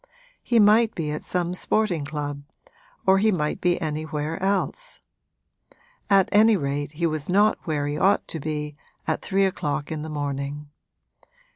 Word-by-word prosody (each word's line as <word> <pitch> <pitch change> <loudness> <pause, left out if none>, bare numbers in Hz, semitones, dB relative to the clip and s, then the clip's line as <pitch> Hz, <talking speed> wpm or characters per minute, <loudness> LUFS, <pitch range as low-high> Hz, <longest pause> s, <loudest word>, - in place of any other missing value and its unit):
He 240 - +1
might 215 +1 +5
be 155 -3 -2
at 150 - -4
some 180 -1 -2
sporting 180 -4 0
club 145 -1 -4 0.6
or 190 0 +5
he 215 +2 +3
might 150 -5 -1
be 175 -1 +2
anywhere 155 +1 -3
else; 200 - -2 1.1
at 195 -2 +5
any 215 +1 +5
rate 145 -1 -3
he 170 +3 -1
was 155 -1 -2
not 205 +3 +3
where 150 -3 -1
he 145 +1 -2
ought 195 - +3
to 160 - -3
be 150 0 -4 0.3
at - - -1
three 195 0 +1
o'clock 150 -6 -2
in 155 -1 -3
the 160 - -6
morning. 145 0 -4
160 Hz, 155 wpm, -24 LUFS, 150-195 Hz, 1.1 s, might